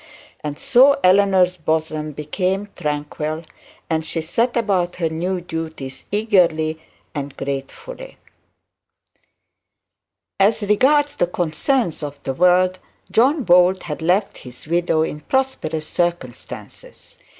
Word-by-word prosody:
And 145 -1 -4
so 275 - +5
Eleanor's 185 -1 +4
bosom 155 -1 -2
became 185 +7 -2
tranquil, 150 +2 -3 0.4
and 160 -1 0
she 165 +1 -3
set 230 +10 0
about 190 -6 0
her 165 -2 -1
new 180 +4 -2
duties 160 -6 -6
eagerly 170 -7 +2 0.3
and 145 -2 -5
gratefully. 455 - -6 2.2
As 205 +2 +3
regards 285 +8 +3
the 175 - +2
concerns 175 - -1
of 145 -1 -5
the 135 - -2
world, 180 +4 +3 0.3
John 270 +6 +3
Bold 180 0 +4
had 150 -3 -5
left 185 +5 +1
his 125 -1 -12
widow 170 0 +1
in 150 - -4
prosperous 160 - -1
circumstances. 175 -9 -5
175 Hz, 110 wpm, -20 LUFS, 155-205 Hz, 2.2 s, so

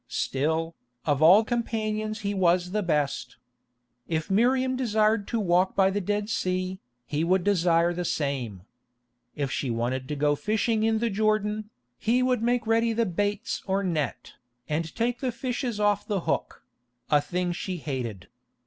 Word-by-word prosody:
Still, 160 +4 -1 0.3
of 145 -2 +1
all 185 +7 +8
companions 215 -2 -2
he 200 -1 -1
was 180 -1 +2
the 210 +1 0
best. 150 -6 -1 0.7
If 160 +3 -2
Miriam 255 +5 +3
desired 215 -4 +1
to 230 - -1
walk 185 -1 +2
by 195 -1 +4
the 205 +1 -1
Dead 205 +2 -1
Sea, 185 -2 -1 0.3
he 150 +2 -1
would 180 +2 +2
desire 175 -3 +3
the 175 +1 -3
same. 130 - -2 0.7
If 140 -2 -2
she 135 - -2
wanted 120 +3 -2
to 150 - -3
go 145 +1 +2
fishing 215 +5 0
in 220 0 +2
the 230 0 0
Jordan, 215 +1 0 0.3
he 245 +3 +2
would 255 -3 +1
make 240 0 +1
ready 225 +1 +2
the 230 +1 +1
baits 205 +2 -2
or 195 +1 +1
net, 155 - -2 0.3
and 160 +1 -2
take 235 +1 0
the 260 -2 -1
fishes 245 -2 -3
off 205 -1 +1
the 200 -4 -1
hook—a 125 -2 -2
thing 175 +4 -2
she 180 +1 -4
hated. 125 - -5
190 Hz, 155 wpm, -27 LUFS, 155-215 Hz, 0.7 s, all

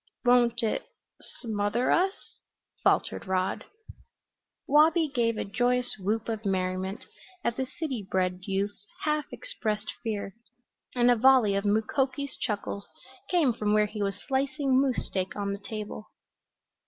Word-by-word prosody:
"Won't 240 -1 +4
it 220 - -1 0.3
smother 220 +1 -1
us?" 380 +3 0 0.4
faltered - - +1
Rod. 185 0 0 1.0
Wabi 315 +3 +5
gave 230 -3 +1
a - - -2
joyous 245 +4 +1
whoop 215 +4 -1
of 220 -1 -3
merriment 190 +1 -1 0.4
at 235 - 0
the 260 0 -2
city 265 - -4
bred 180 -1 0
youth's 200 +1 -2 0.2
half 300 -1 +1
expressed 215 - -3
fear 210 -4 -3 0.6
and 245 0 +5
a - - +5
volley 245 -3 +5
of 200 +1 -1
Mukoki's 260 +6 0
chuckles 205 -1 -3 0.4
came 320 -9 +3
from 210 -2 0
where 210 0 +4
he 210 0 -6
was 195 -1 0
slicing 265 +2 +1
moose 265 -3 +1
steak 185 -1 -3
on 200 -1 -2
the 200 - -5
table. 210 +1 -7
220 Hz, 135 wpm, -28 LUFS, 200-260 Hz, 1.0 s, Wabi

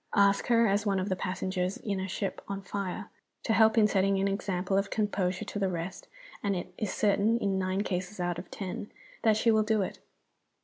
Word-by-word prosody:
Ask 200 -1 +4
her, 235 -1 +5
as 205 -1 +2
one 200 -3 +1
of 185 +2 -2
the 185 - +1
passengers 185 0 -2
in 200 -3 -3
a 190 - -2
ship 190 0 -3
on 195 0 -4
fire, 200 +1 -4 0.3
to 225 - +1
help 220 +1 +5
in 220 - +7
setting 195 -1 +2
an 195 - +2
example 195 -1 -1
of 195 +1 +1
composure 195 -4 -1
to 205 - -4
the 195 -1 +1
rest, 175 +1 -5 0.3
and 200 -1 0
it 180 0 -5
is 210 -1 -2
certain, 210 +2 +2
in 195 -4 0
nine 185 +1 0
cases 185 +1 -3
out 175 -1 -1
of 180 - -9
ten, 195 +1 -5 0.3
that 220 -2 +4
she 230 +1 +4
will 220 -1 +4
do 215 -1 +2
it. - - -6
195 Hz, 215 wpm, -29 LUFS, 185-210 Hz, 0.3 s, in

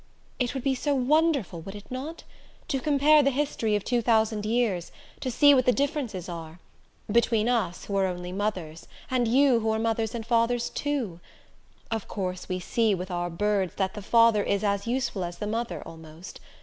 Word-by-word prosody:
"It 250 +1 -1
would 265 - -3
be 275 - +2
so 285 +2 0
wonderful 275 - +1
would 195 +5 -9
it 205 +3 -12
not? 285 +6 -6 0.5
To 270 - 0
compare 295 +2 +4
the 275 - +3
history 260 -6 0
of 205 - -1
two 240 -1 +1
thousand 220 -2 +1
years, 215 -7 0 0.3
to 260 - -3
see 285 +4 +6
what 255 -2 +3
the - - +7
differences 270 - -2
are 165 -2 -7 0.5
between 230 -1 +2
us, 215 -8 0
who 200 - -4
are 190 -1 +2
only 180 -1 -5
mothers, 185 -5 -4 0.2
and 250 -2 +2
you, 260 0 +4
who 220 0 -1
are 220 - +1
mothers 225 0 -1
and 225 -2 -5
fathers, 235 0 +1
too. 260 -12 -2 0.7
Of 225 -2 -2
course 185 -2 -4
we 185 0 -1
see, 220 +3 +1
with 185 +1 -6
our 175 0 -2
birds, 195 +1 0
that 190 -1 -1
the 210 - -7
father 230 0 +4
is 200 0 0
as 200 +1 0
useful 240 -6 -1
as 175 0 -5
the 210 - -4
mother, 230 +3 -3
almost. 160 +2 -11
220 Hz, 190 wpm, -27 LUFS, 190-250 Hz, 0.7 s, the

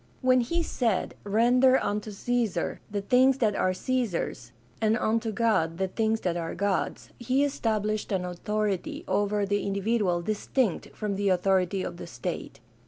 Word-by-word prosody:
When 255 -1 +4
he 335 +8 -1
said, 230 - -1
"Render 245 +5 +4
unto 210 -2 -2
Caesar 215 -3 -1
the 205 -1 -3
things 255 +5 +4
that 215 -5 +1
are 185 - +2
Caesar's, 185 - -2 0.3
and 220 +1 +3
unto 225 -1 0
God 195 -8 +1
the 190 0 -1
things 220 +2 0
that 175 -2 -1
are 165 -1 -3
God's," 200 -1 -1
he 255 +4 +1
established 215 -7 -1
an 185 -2 0
authority 200 +2 -2
over 205 +1 +1
the 205 +1 0
individual 200 -3 0
distinct 215 +1 -1
from 205 -2 -2
the 200 0 +1
authority 185 0 +2
of - - -5
the - - -8
state. - - -5
210 Hz, 155 wpm, -27 LUFS, 190-235 Hz, 0.3 s, When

